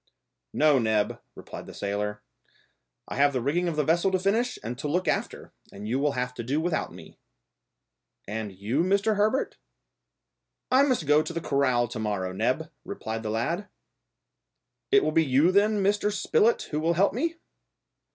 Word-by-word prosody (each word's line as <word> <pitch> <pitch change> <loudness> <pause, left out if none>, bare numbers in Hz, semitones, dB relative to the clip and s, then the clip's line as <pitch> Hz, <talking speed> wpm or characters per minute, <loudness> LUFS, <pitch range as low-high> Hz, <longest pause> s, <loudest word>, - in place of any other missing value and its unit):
"No, 150 -3 +4
Neb," 110 -3 0
replied - - -9
the - - -10
sailor; 105 +1 -3 0.8
"I - - -6
have 145 0 +4
the 130 - 0
rigging 155 +8 0
of 170 - -2
the 150 - +1
vessel 170 +6 +2
to 190 - +1
finish 220 +7 0
and 115 +3 -4
to - - -3
look 180 +5 0
after, - - -2 0.2
and 105 +2 -8
you 125 +4 0
will 145 0 +1
have 125 0 -2
to 120 - -6
do 135 +6 0
without 165 0 -1
me." - - -14 1.1
"And 105 0 -4
you, 105 - -1
Mr. 200 +4 +2
Herbert?" 215 +6 0 1.1
"I 260 +1 +6
must 255 - +1
go 150 +1 +5
to 170 - -5
the 170 - -2
corral 130 -6 +1
to 120 -1 -6
morrow, 100 -4 -2
Neb," 95 - -1
replied 110 0 -5
the 110 - -4
lad. 165 - -2 1.2
"It 410 0 +5
will - - +1
be 165 - +3
you 145 +5 +3
then, 205 +1 +3
Mr. 205 +1 +1
Spilett, 460 - +2
who 150 - -1
will 165 +2 +1
help 190 +4 +3
me?" 325 +8 -1
150 Hz, 175 wpm, -27 LUFS, 120-195 Hz, 1.2 s, I